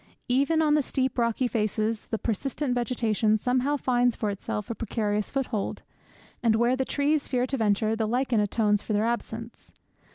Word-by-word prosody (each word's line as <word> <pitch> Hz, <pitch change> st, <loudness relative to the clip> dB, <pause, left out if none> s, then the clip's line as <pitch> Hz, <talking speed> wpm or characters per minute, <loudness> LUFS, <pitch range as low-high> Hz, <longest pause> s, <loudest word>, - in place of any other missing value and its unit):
Even 280 Hz, +6 st, +3 dB
on 300 Hz, -1 st, +3 dB
the 300 Hz, -, +4 dB
steep 260 Hz, -2 st, -1 dB
rocky 235 Hz, +2 st, +1 dB
faces 215 Hz, -1 st, -1 dB
the 220 Hz, -, -2 dB
persistent 250 Hz, +5 st, -2 dB
vegetation 225 Hz, -3 st, +1 dB
somehow 255 Hz, +5 st, +1 dB
finds 245 Hz, -2 st, +2 dB
for 210 Hz, -2 st, -1 dB
itself 210 Hz, +2 st, -4 dB
a -, -, 0 dB
precarious 210 Hz, -2 st, -2 dB
foothold; 250 Hz, -7 st, -2 dB, 0.6 s
and 230 Hz, -2 st, +3 dB
where 235 Hz, +3 st, +3 dB
the 265 Hz, 0 st, -1 dB
trees 290 Hz, +2 st, 0 dB
fear 250 Hz, -2 st, +1 dB
to 270 Hz, +1 st, -2 dB
venture 215 Hz, 0 st, +1 dB
the 220 Hz, -1 st, -1 dB
lichen 245 Hz, 0 st, +1 dB
atones 210 Hz, 0 st, +2 dB
for 215 Hz, -, -3 dB
their 210 Hz, +1 st, +2 dB
absence. 230 Hz, 0 st, -4 dB
235 Hz, 170 wpm, -27 LUFS, 215-260 Hz, 0.6 s, the